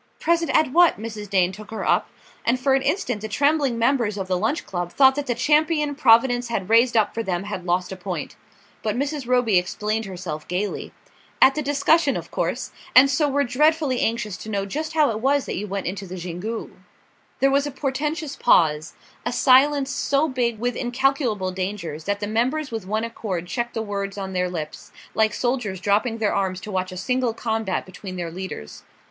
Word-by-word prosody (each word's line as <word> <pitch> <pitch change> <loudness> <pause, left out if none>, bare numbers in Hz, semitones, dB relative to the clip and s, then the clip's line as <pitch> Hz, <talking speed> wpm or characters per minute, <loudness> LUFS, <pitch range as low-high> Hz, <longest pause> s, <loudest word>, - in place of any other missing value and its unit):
"Present 335 0 +1
at 310 -4 +2
what?" 345 +3 +5
Mrs. 215 -2 -6
Dane 185 -2 +2
took 210 +2 -11
her 220 - -4
up; - - +2 0.3
and 245 +2 +1
for 270 +1 +2
an 270 - +3
instant 250 - -1
the 220 - -4
trembling 280 +1 +1
members 230 -3 +1
of 190 -2 -3
the 185 - +1
Lunch 220 - -1
Club 175 -2 -4
thought 265 -1 +6
that 290 +1 -4
the 245 - 0
champion 300 0 +2
Providence 245 -2 +4
had 215 -3 -3
raised 235 +1 +5
up 210 -2 +2
for 230 - -2
them 185 -4 -2
had 195 -3 -6
lost 180 +1 0
a - - -4
point. 185 -1 -5 0.5
But 215 -1 -1
Mrs. 280 -1 -2
Roby 245 -6 +3
explained 210 +5 -2
herself 175 -5 -6
gaily: 190 +4 -3 0.5
"At 270 - +7
the 305 - -2
discussion, 290 +1 +2
of - - -8
course. - - -2 0.2
And 270 +2 +8
so 290 +2 +2
we're 285 +1 +2
dreadfully 295 +1 +2
anxious 215 -4 -1
to 215 - -9
know 200 -2 -1
just 310 +10 -4
how 300 -5 +3
it 215 - -3
was 275 +3 +2
that - - -4
you 210 +3 -4
went 195 0 -4
into 195 +2 -4
the 185 +1 -7
Xingu." 180 +6 -5 0.7
There 270 0 +4
was 280 +1 +2
a - - -4
portentous 295 +2 -3
pause, 155 -7 +3 0.3
a - - -2
silence 270 +2 +4
so 280 +4 +1
big 245 -4 -1
with 245 +3 -2
incalculable 245 -6 0
dangers 185 -4 -4
that 205 0 -1
the 205 - -2
members 260 +7 0
with 220 -5 -5
one 215 +2 -1
accord 205 -6 -4
checked 240 +6 -3
the 225 - -1
words 200 -1 -4
on 190 -1 -5
their 180 0 0
lips, 155 -4 -6 0.2
like 220 -1 +2
soldiers 240 -6 -2
dropping 210 +4 +1
their 215 -2 0
arms 190 -2 -1
to 210 - -7
watch 185 -1 -2
a 185 - -7
single 250 +2 0
combat 220 -5 -2
between 185 0 -9
their 175 -2 -4
leaders. 180 - -7
225 Hz, 200 wpm, -23 LUFS, 190-270 Hz, 0.7 s, And